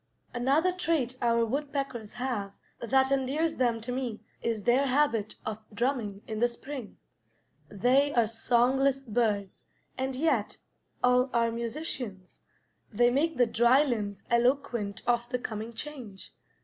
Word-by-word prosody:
Another 275 +9 +2
trait 325 -9 -1
our 235 -1 +3
woodpeckers 275 -3 -3
have 225 -6 -3 0.2
that 265 +3 +2
endears 275 +5 0
them 240 -3 +1
to 240 +3 -4
me 245 -4 -3 0.2
is 225 -3 -2
their 255 +5 +3
habit 250 -6 +1
of 215 0 -4
drumming 220 -3 -2
in 220 -1 -4
the 240 - +4
spring. 245 0 -8 0.7
They 255 +8 +3
are 235 -2 +5
songless 255 +4 +2
birds, 210 -4 -1 0.3
and 265 0 -1
yet 265 -7 0 0.5
all 250 +1 +4
are 230 -1 +2
musicians; 230 - -5 0.5
they 240 +3 +4
make 300 +3 +1
the 245 - +5
dry 240 +5 +4
limbs 210 -7 -3
eloquent 235 -4 +1
of 240 0 +1
the 250 - 0
coming 220 -1 -5
change. 235 -5 -8
245 Hz, 135 wpm, -29 LUFS, 225-270 Hz, 0.7 s, are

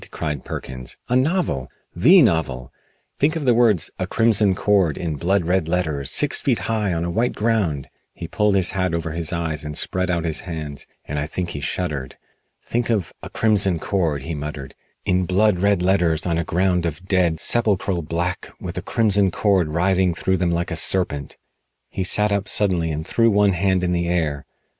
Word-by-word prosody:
cried 75 -4 -4
Perkins. 65 -1 -7
"A 125 - +1
novel! 130 - 0 0.3
The 165 - +6
novel! 80 - -1 0.5
Think 150 +3 +2
of 155 -3 -3
the 125 - +5
words 115 -8 +3
'A - - -2
Crimson 110 -4 +3
Cord' 95 -6 +2
in 80 -3 -3
blood 90 +4 0
red 90 -1 +1
letters 80 -6 -1
six - - +2
feet - - +1
high 110 -4 -1
on 85 -1 -1
a 85 - -2
white 120 +8 0
ground!" 105 - 0 0.3
He 85 - -7
pulled 105 +3 +1
his 95 -2 +2
hat 90 -3 -1
over 80 -1 -3
his 80 0 -2
eyes 80 -3 -2
and 75 0 -4
spread 95 0 0
out 85 -2 0
his 80 -2 -1
hands, 75 -4 -7 0.2
and 75 0 -3
I 75 - -2
think 90 +2 -4
he 75 - -5
shuddered. 75 -4 -4 0.5
"Think 120 0 -2
of 105 -8 -1
'A - - -8
Crimson 100 -5 +2
Cord,'" 80 -6 -1
he 80 - -4
muttered, 75 -2 -6 0.3
"in 90 -1 +1
blood 95 +1 +2
red 100 -3 +2
letters 85 -4 +2
on 85 -2 0
a - - 0
ground 90 0 +1
of 85 +3 -6
dead, 90 -4 +1
sepulchral 100 -4 +1
black, 85 +3 -3
with - - -5
a - - -6
crimson 100 -3 +2
cord 95 -2 +1
writhing 90 +2 +1
through 95 +2 0
them 90 0 0
like 85 +1 -1
a - - -1
serpent." 80 -5 -1 0.5
He 95 - -3
sat 105 +3 +2
up 100 0 -1
suddenly 90 -5 +1
and 80 0 -4
threw 115 +5 +2
one 105 -1 +3
hand 95 0 +1
in 90 - 0
the 85 -1 0
air. 80 -5 -1
90 Hz, 195 wpm, -21 LUFS, 80-100 Hz, 0.5 s, The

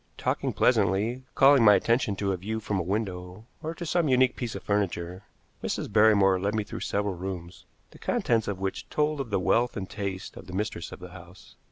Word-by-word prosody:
Talking - - -1
pleasantly, 115 +7 +1
calling 135 -2 +6
my 105 -2 +8
attention 115 +1 +1
to 100 0 -1
a - - 0
view 110 +5 -4
from 105 -2 -2
a - - +1
window, 95 +1 -4 0.2
or 160 +1 -4
to 170 - -6
some 170 0 +1
unique 130 -1 +3
piece 120 -3 -4
of - - -7
furniture, 95 -2 -2 0.4
Mrs. - - -3
Barrymore 100 -3 +5
led 100 +3 -1
me 110 - 0
through 105 - -7
several 100 -1 -1
rooms, 90 0 -7 0.2
the - - -16
contents 115 -2 0
of 100 - -2
which 95 0 -4
told 150 -1 0
of 125 - -6
the 100 - +1
wealth 120 +6 +1
and 95 -2 -4
taste 100 -2 -5
of - - -11
the 90 - -9
mistress 95 -3 -3
of - - -10
the 90 -1 -9
house. 90 0 -14
100 Hz, 210 wpm, -27 LUFS, 95-115 Hz, 0.4 s, my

